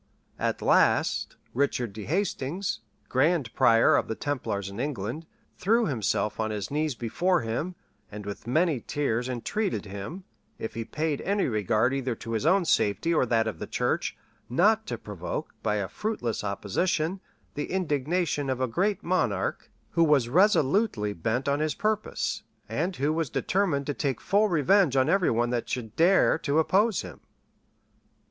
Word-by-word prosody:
At -, -, -1 dB
last, -, -, +3 dB, 0.2 s
Richard 125 Hz, -4 st, 0 dB
de 105 Hz, 0 st, -7 dB
Hastings, 170 Hz, -, -1 dB, 0.3 s
grand 140 Hz, -1 st, +1 dB
prior 115 Hz, 0 st, +5 dB
of -, -, +1 dB
the 110 Hz, -, -3 dB
templars 115 Hz, -9 st, -3 dB
in 100 Hz, +2 st, -7 dB
England, 140 Hz, +3 st, -3 dB, 0.3 s
threw 225 Hz, +4 st, +3 dB
himself 110 Hz, -, -1 dB
on 110 Hz, 0 st, 0 dB
his 105 Hz, +1 st, -4 dB
knees 150 Hz, -2 st, 0 dB
before 175 Hz, +10 st, +1 dB
him, 120 Hz, +11 st, -3 dB, 0.4 s
and 105 Hz, 0 st, -7 dB
with 100 Hz, +2 st, -7 dB
many 155 Hz, +2 st, +2 dB
tears 125 Hz, -4 st, -1 dB
entreated 180 Hz, -, -2 dB
him, 100 Hz, -, -7 dB, 0.3 s
if 110 Hz, -, -5 dB
he 115 Hz, -, -3 dB
paid 150 Hz, +3 st, -2 dB
any 200 Hz, 0 st, +1 dB
regard 110 Hz, +2 st, +1 dB
either 130 Hz, -3 st, -1 dB
to 115 Hz, -, -8 dB
his 115 Hz, +6 st, 0 dB
own 185 Hz, +1 st, +4 dB
safety 160 Hz, +5 st, +2 dB
or 140 Hz, -6 st, +2 dB
that 115 Hz, -1 st, +2 dB
of 110 Hz, -, -4 dB
the -, -, -5 dB
church, -, -, -1 dB, 0.3 s
not 215 Hz, -, +3 dB
to 120 Hz, -, -3 dB
provoke, 100 Hz, -5 st, -5 dB
by 105 Hz, -, 0 dB
a 100 Hz, -2 st, -1 dB
fruitless 210 Hz, -, -3 dB
opposition, 155 Hz, -, -1 dB, 0.3 s
the 145 Hz, -, -4 dB
indignation 155 Hz, -3 st, 0 dB
of 130 Hz, -1 st, -1 dB
a 130 Hz, -, +2 dB
great 190 Hz, -, 0 dB
monarch, 185 Hz, +1 st, -1 dB, 0.2 s
who 170 Hz, -, +3 dB
was 145 Hz, -7 st, +3 dB
resolutely 155 Hz, -, +3 dB
bent 115 Hz, +9 st, -2 dB
on 140 Hz, +1 st, +1 dB
his 155 Hz, 0 st, 0 dB
purpose, 215 Hz, 0 st, -1 dB, 0.3 s
and 160 Hz, -, -2 dB
who 145 Hz, +3 st, 0 dB
was 160 Hz, -3 st, -1 dB
determined 175 Hz, -6 st, 0 dB
to 145 Hz, -, -1 dB
take 135 Hz, -4 st, -2 dB
full 205 Hz, +2 st, +2 dB
revenge 175 Hz, -2 st, +3 dB
on 130 Hz, -1 st, +3 dB
every 190 Hz, -3 st, +3 dB
one 120 Hz, +1 st, +1 dB
that 120 Hz, -1 st, -2 dB
should 115 Hz, -3 st, -4 dB
dare 175 Hz, 0 st, +4 dB
to 145 Hz, -1 st, 0 dB
oppose 195 Hz, +6 st, +3 dB
him. 85 Hz, -8 st, -10 dB
140 Hz, 165 wpm, -27 LUFS, 115-175 Hz, 0.4 s, prior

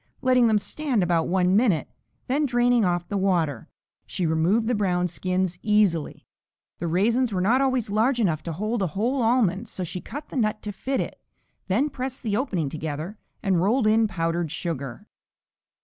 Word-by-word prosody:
Letting 255 Hz, -2 st, +4 dB
them 220 Hz, -1 st, +4 dB
stand 230 Hz, +2 st, -1 dB
about 170 Hz, -2 st, +1 dB
a 185 Hz, -1 st, +2 dB
minute, 190 Hz, -1 st, +3 dB, 0.4 s
then 285 Hz, +3 st, +1 dB
draining 245 Hz, -1 st, +3 dB
off 175 Hz, -2 st, 0 dB
the 205 Hz, -, -2 dB
water, 170 Hz, -, 0 dB, 0.4 s
she 180 Hz, -, -2 dB
removed 165 Hz, +8 st, +2 dB
the 245 Hz, -, +1 dB
brown 180 Hz, -4 st, +1 dB
skins 180 Hz, +1 st, -2 dB
easily. 210 Hz, -7 st, +1 dB, 0.5 s
The 170 Hz, -, -2 dB
raisins 225 Hz, +8 st, +2 dB
were 190 Hz, -, -1 dB
not 230 Hz, +8 st, +3 dB
always 255 Hz, -6 st, 0 dB
large 235 Hz, +5 st, +2 dB
enough 170 Hz, -9 st, +1 dB
to 170 Hz, -, -3 dB
hold 215 Hz, +7 st, -2 dB
a 190 Hz, -, +1 dB
whole 250 Hz, +6 st, +1 dB
almond 225 Hz, -3 st, +2 dB
so 185 Hz, -, -5 dB
she 180 Hz, +1 st, -5 dB
cut 295 Hz, +2 st, -8 dB
the -, -, -9 dB
nut 215 Hz, -2 st, 0 dB
to 210 Hz, -, -4 dB
fit 260 Hz, +7 st, -2 dB
it, -, -, -6 dB, 0.5 s
then 260 Hz, +11 st, +1 dB
pressed 260 Hz, 0 st, -5 dB
the 215 Hz, -4 st, 0 dB
opening 205 Hz, -, -1 dB
together 155 Hz, +7 st, -5 dB, 0.2 s
and 190 Hz, -5 st, +2 dB
rolled 220 Hz, +6 st, +2 dB
in 220 Hz, +1 st, +4 dB
powdered 165 Hz, -4 st, -2 dB
sugar. 140 Hz, -7 st, -4 dB
205 Hz, 180 wpm, -25 LUFS, 175-240 Hz, 0.5 s, Letting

